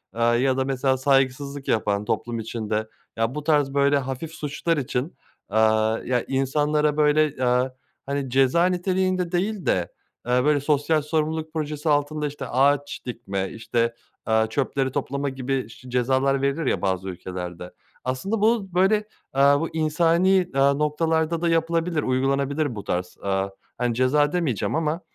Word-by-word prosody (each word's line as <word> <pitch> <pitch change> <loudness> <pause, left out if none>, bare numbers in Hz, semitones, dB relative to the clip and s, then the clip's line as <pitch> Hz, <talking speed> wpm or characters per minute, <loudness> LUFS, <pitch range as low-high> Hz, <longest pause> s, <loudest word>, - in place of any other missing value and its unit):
eee, 115 - -3
ya 120 +3 +3
da 130 - +1
mesela 130 0 +1
saygısızlık 135 +1 0
yapan 105 -2 0
toplum 120 +1 -2
içinde, 110 -1 -3 0.3
ya, 115 +4 0
bu 150 - -4
tarz 145 -3 +2
böyle 140 0 +3
hafif 135 +4 -4
suçlar 160 +1 -2
için, 135 +2 -2 0.4
eee, 110 - 0 0.5
ya, 125 -1 +2
insanlara, 150 +3 +1
böyle, 150 +1 +4
eee, 125 0 +1 0.3
hani, 140 -1 -2
ceza 135 +6 +3
niteliğinde 185 0 0
değil 195 +2 -1
de, 90 -2 0 0.4
eee, 125 +1 +3
böyle, 145 0 +3
sosyal 150 +2 +1
sorumluluk 155 +1 -2
projesi 155 -1 -2
altında, 150 +1 +1
işte, 140 -2 -6
ağaç 140 +3 +1
dikme, 100 -6 -4
işte, 115 +1 -1 0.3
eee, 110 0 +3
çöpleri 135 +1 -1
toplama 140 +1 -2
gibi 130 -3 -3
ş 125 +2 -13
cezalar 130 +2 +1
verilir, 140 +3 0
ya, - - 0
bazı 95 0 -1
ülkelerde. 90 -1 -7 0.3
Aslında 190 +13 -2
bu, 215 -4 +1
böyle, 190 +4 +4 0.4
eee, 135 - +3 0.2
bu 165 - -2
insani, 165 +3 +2
eee, 185 -2 +3
noktalarda 150 +4 +1
da 170 - +1
yapılabilir, 165 -1 +1
uygulanabilir 135 +1 0
bu 105 - -6
tarz, 90 0 -3
eee, 95 0 0 0.3
hani, 120 -1 0
ceza 145 +4 +3
demeyeceğim 155 - -1
ama. 160 +1 -1
140 Hz, 150 wpm, -24 LUFS, 125-155 Hz, 0.5 s, böyle